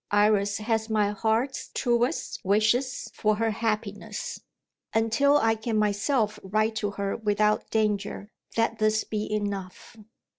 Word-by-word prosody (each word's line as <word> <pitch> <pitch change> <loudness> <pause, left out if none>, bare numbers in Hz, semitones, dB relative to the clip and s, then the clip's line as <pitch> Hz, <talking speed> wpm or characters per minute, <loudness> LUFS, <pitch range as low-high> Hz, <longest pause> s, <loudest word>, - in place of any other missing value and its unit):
Iris 205 -1 +3
has 220 0 -1
my 210 -2 +2
heart's 220 +6 -1
truest 240 0 0
wishes 215 +6 +1
for 215 0 +1
her 225 +1 0
happiness. 210 -1 -3 0.5
Until 225 +6 +4
I 225 -4 +3
can 220 0 -2
myself 215 +1 +1
write 215 +3 0
to 205 - -1
her 200 -1 -1
without 210 -1 +1
danger, 210 -1 -1 0.3
let 230 0 +1
this 215 0 +2
be 210 -1 -4
enough." 200 -1 -4
215 Hz, 125 wpm, -27 LUFS, 205-225 Hz, 0.5 s, Until